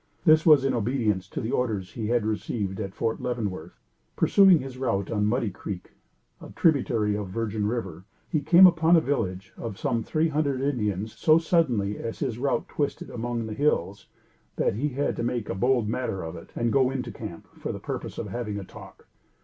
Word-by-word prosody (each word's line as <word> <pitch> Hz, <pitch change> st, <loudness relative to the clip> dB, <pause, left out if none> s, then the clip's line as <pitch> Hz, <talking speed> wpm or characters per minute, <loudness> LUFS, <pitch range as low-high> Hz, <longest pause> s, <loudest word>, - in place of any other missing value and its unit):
This 155 Hz, +1 st, +5 dB
was 145 Hz, -4 st, +7 dB
in 135 Hz, -, +1 dB
obedience 110 Hz, -5 st, 0 dB
to -, -, -5 dB
the 115 Hz, -, -3 dB
orders 105 Hz, -7 st, -1 dB
he 110 Hz, -3 st, -4 dB
had 120 Hz, -1 st, +1 dB
received 105 Hz, -2 st, -2 dB
at 95 Hz, -2 st, -5 dB
Fort 115 Hz, -, -2 dB
Leavenworth. 105 Hz, -9 st, -4 dB, 0.4 s
Pursuing 195 Hz, -3 st, +6 dB
his 130 Hz, -3 st, -7 dB
route 105 Hz, -7 st, -1 dB
on 105 Hz, -2 st, +1 dB
Muddy 115 Hz, -1 st, 0 dB
Creek, 90 Hz, 0 st, -7 dB, 0.5 s
a -, -, -10 dB
tributary 120 Hz, -9 st, +2 dB
of 105 Hz, -1 st, -3 dB
Virgin 105 Hz, +1 st, -2 dB
River, 95 Hz, -7 st, -4 dB, 0.2 s
he 155 Hz, -, 0 dB
came 180 Hz, +4 st, +7 dB
upon 170 Hz, -1 st, +5 dB
a -, -, +7 dB
village 105 Hz, -11 st, -2 dB
of 110 Hz, -4 st, -6 dB
some 115 Hz, -, -1 dB
three 155 Hz, +8 st, 0 dB
hundred 145 Hz, -3 st, 0 dB
Indians, 110 Hz, -7 st, -1 dB
so 155 Hz, 0 st, +5 dB
suddenly, 130 Hz, -, +1 dB
as 115 Hz, -, -5 dB
his 125 Hz, -5 st, -3 dB
route 140 Hz, +2 st, 0 dB
twisted 145 Hz, -2 st, -3 dB
about -, -, -9 dB
among 120 Hz, 0 st, -2 dB
the 110 Hz, -, -5 dB
hills, 105 Hz, -6 st, 0 dB, 0.5 s
that -, -, +1 dB
he 125 Hz, +9 st, -1 dB
had 140 Hz, +2 st, -1 dB
to -, -, -2 dB
make 120 Hz, -2 st, -2 dB
a -, -, -1 dB
bold 120 Hz, +3 st, +1 dB
matter 110 Hz, -4 st, -2 dB
of 80 Hz, -, -6 dB
it, 85 Hz, -, -11 dB
and 120 Hz, -1 st, 0 dB
go 130 Hz, -2 st, +4 dB
into 130 Hz, -2 st, -4 dB
camp, 105 Hz, -7 st, -8 dB
for -, -, -3 dB
the -, -, -5 dB
purpose -, -, -5 dB
of -, -, -3 dB
having 105 Hz, -1 st, -4 dB
a 100 Hz, -, -5 dB
"talk." -, -, -13 dB
115 Hz, 200 wpm, -26 LUFS, 105-135 Hz, 0.5 s, was